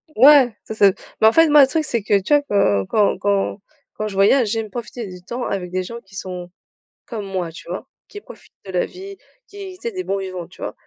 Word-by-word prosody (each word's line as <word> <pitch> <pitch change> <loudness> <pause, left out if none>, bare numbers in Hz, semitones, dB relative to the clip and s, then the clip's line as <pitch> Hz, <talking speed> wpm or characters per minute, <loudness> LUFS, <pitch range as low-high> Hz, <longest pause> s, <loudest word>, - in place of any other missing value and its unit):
Ouais, 260 -2 +7
ça 220 - -7
c'est 200 -2 +5 0.2
mais 220 - +6
en 220 - +5
fait, 325 -1 +5
moi 295 0 +7
le 265 - +7
truc 315 +3 0
c'est 235 -6 -2
que, 200 -1 +2
tu 295 - 0
vois 290 - +5
quand 105 - +2
quand 210 -2 +2
quand 200 0 0 0.4
quand 215 - -3
je 205 - -6
voyage, 210 +6 +4
j'aime 225 -1 -2
profiter 235 +1 -6
du 180 -1 -10
temps 240 +7 -5
avec 180 -3 -3
des 185 0 -1
gens 235 +6 -7
qui 195 -3 -19
sont 180 -2 -6 0.6
comme 220 -4 -6
moi, 185 -4 -3
tu 170 - -13
vois? 185 +8 -5 0.2
Qui 415 - -10
profitent - - -15
de 190 - -7
la 180 - +1
vie, 390 +1 -10 0.3
qui 395 -2 -9
tu 365 - -22
sais 470 - -3
des 370 -3 -5
bons 195 - -1
vivants, 185 -3 -6
tu - - -17
vois? - - -4
210 Hz, 250 wpm, -20 LUFS, 190-270 Hz, 0.6 s, Ouais